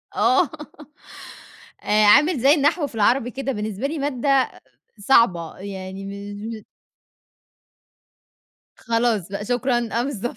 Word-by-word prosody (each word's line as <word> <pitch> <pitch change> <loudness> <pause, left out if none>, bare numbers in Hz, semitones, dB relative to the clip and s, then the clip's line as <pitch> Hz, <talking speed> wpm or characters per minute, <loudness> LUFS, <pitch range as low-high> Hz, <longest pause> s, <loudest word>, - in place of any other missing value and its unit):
آه، 380 -4 +3 1.3
آآ، 210 0 +3
عامل 290 - +5
زي 275 +4 +5
النحو 300 +1 +1
في 245 - -14
العربي 245 +3 +2
كده 270 +2 -4
بالنسبة 215 +2 -3
لي 305 +1 -5
مادة 275 -1 +1 0.5
صعبة، 195 -7 +2
يعني 190 0 -8
مش 205 +3 -7
م - - -24 2.1
خلاص 230 -5 -1
بقى 200 +1 -5
شكرًا 245 0 0
آه، - - +1
بالضبط. 245 -4 -4
235 Hz, 115 wpm, -22 LUFS, 205-275 Hz, 2.1 s, عامل